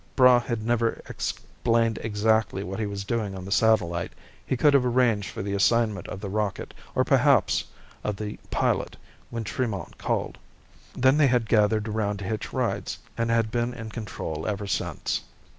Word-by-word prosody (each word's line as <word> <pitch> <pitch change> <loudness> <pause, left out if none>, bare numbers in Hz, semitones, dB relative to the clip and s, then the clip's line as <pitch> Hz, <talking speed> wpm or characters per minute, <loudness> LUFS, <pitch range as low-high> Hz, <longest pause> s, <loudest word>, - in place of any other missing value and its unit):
Braigh 125 -2 +7
had 115 -2 -3
never 115 -1 +1
explained 115 -1 -1
exactly 110 -2 +1
what 95 +1 -5
he 110 - -1
was 100 -1 -4
doing 100 -2 -2
on 90 - -7
the 100 - -7
satellite; 100 -6 +2 0.3
he 130 - -1
could 145 +4 +5
have 140 -2 +5
arranged 120 -5 +2
for - - -5
the 100 0 -3
assignment 105 -1 +2
of 95 - -6
the 105 - -4
rocket, 105 0 -2 0.2
or - - +4
perhaps - - +3 0.4
of 105 - -1
the 105 +1 -6
pilot, - - 0 0.3
when 115 -1 -4
Tremont 105 -5 -3
called. - - -2 0.6
Then 130 +3 +4
they 150 -2 +5
had 125 -3 +2
gathered 110 0 +3
around 105 -1 -1
to 100 - -6
hitch 110 +2 -3
rides, - - -1 0.2
and 115 0 -1
had 115 -2 +2
been 120 +1 -1
in 110 -2 -7
control 85 -8 -5
ever 105 -1 -2
since. 95 - -2
110 Hz, 175 wpm, -26 LUFS, 100-115 Hz, 0.6 s, Braigh